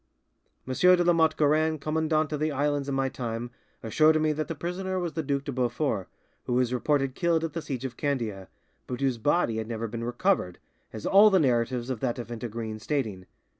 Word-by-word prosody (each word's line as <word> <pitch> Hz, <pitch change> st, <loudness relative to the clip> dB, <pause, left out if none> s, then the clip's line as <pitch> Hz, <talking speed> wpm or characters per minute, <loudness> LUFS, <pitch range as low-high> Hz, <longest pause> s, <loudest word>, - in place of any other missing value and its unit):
M. 130 Hz, -, -2 dB
de 180 Hz, +5 st, +5 dB
La 175 Hz, 0 st, +4 dB
Motte 160 Hz, -2 st, +3 dB
Guerin, 155 Hz, +1 st, +2 dB
commandant 155 Hz, +1 st, 0 dB
of 150 Hz, -, -2 dB
the 155 Hz, 0 st, 0 dB
islands 145 Hz, 0 st, 0 dB
in 135 Hz, -, -1 dB
my 135 Hz, 0 st, +1 dB
time, 120 Hz, -2 st, -4 dB, 0.3 s
assured 155 Hz, +8 st, +4 dB
me 155 Hz, 0 st, +2 dB
that 155 Hz, +1 st, -3 dB
the 165 Hz, -, -4 dB
prisoner 185 Hz, +4 st, -3 dB
was 175 Hz, -3 st, -3 dB
the 160 Hz, -, -1 dB
Duc 140 Hz, -2 st, -1 dB
de 140 Hz, -, -4 dB
Beaufort, 120 Hz, -5 st, -1 dB, 0.4 s
who 125 Hz, -, -2 dB
was 125 Hz, 0 st, +1 dB
reported 135 Hz, +1 st, +1 dB
killed 165 Hz, +1 st, +1 dB
at 165 Hz, -3 st, -3 dB
the 165 Hz, -, -3 dB
siege 135 Hz, -4 st, -5 dB
of 125 Hz, -2 st, -6 dB
Candia, 115 Hz, -10 st, -2 dB, 0.4 s
but 125 Hz, -, -4 dB
whose 130 Hz, -4 st, 0 dB
body 145 Hz, -3 st, +1 dB
had 110 Hz, -1 st, -3 dB
never 115 Hz, 0 st, -3 dB
been 115 Hz, +1 st, -5 dB
recovered, 120 Hz, -, 0 dB, 0.3 s
as 110 Hz, -, -8 dB
all 205 Hz, +2 st, +7 dB
the 195 Hz, -, +4 dB
narratives 125 Hz, -2 st, +1 dB
of 125 Hz, -, -3 dB
that 120 Hz, -1 st, -1 dB
event 120 Hz, -1 st, -6 dB
agree 115 Hz, -1 st, -4 dB
in 110 Hz, -, -7 dB
stating. 110 Hz, -9 st, -3 dB
135 Hz, 210 wpm, -27 LUFS, 120-155 Hz, 0.4 s, all